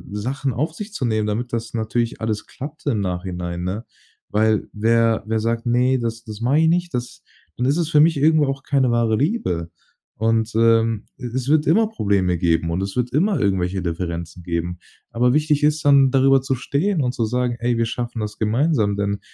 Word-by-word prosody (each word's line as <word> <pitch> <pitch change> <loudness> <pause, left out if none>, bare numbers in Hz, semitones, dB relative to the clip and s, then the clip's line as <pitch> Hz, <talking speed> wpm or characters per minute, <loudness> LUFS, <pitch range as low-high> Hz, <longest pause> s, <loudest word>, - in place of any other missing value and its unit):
Sachen 130 +5 -2
auf 150 +8 -2
sich 210 +4 -8
zu 140 - -2
nehmen, 110 -2 0
damit 115 +4 -3
das 115 -1 -3
natürlich 115 +1 -2
alles 110 -1 -2
klappt 145 +4 -9
im 120 -7 +1
Nachhinein, 90 -2 -4
ne? 100 +6 -4 0.4
Weil 110 0 +1
wer 115 +1 +2
wer 110 0 0
sagt: 115 +2 -1
„Ne, 125 +2 +2
das 115 -1 -4
das 105 -2 -9
mache 130 +6 +2
ich 160 - +4
nicht“, 175 0 0
das 120 -1 -5 0.3
dann 125 - -1
ist 140 +4 +2
es 165 -3 0
für 150 - +4
mich 160 0 +4
irgendwo 155 +1 +4
auch 135 0 -3
keine 135 -3 +1
wahre 115 -2 +2
Liebe. 130 - -1 0.5
Und, 115 +1 0
ähm, 115 -1 +3
e - - -8
es 130 +2 -3
wird 155 0 +3
immer 215 +8 +4
Probleme 100 - 0
geben 85 -1 +1
und 85 +3 -1
es 95 0 -4
wird 125 -1 -1
immer 185 - +2
irgendwelche 95 -2 0
Differenzen 85 0 -4
geben. 85 +1 -3 0.3
Aber 125 +1 +2
wichtig 150 0 +2
ist 150 +1 +2
dann, 140 -2 +6
darüber 135 0 +4
zu 135 0 -1
stehen 155 +8 -1
und 125 -1 -1
zu 115 - -1
sagen: 125 +1 -1
„Ey, 120 0 0
wir 115 - +1
schaffen 120 0 -4
das 105 0 -5
gemeinsam, 110 -1 +1
denn 100 0 -1
115 Hz, 200 wpm, -21 LUFS, 105-135 Hz, 0.5 s, dann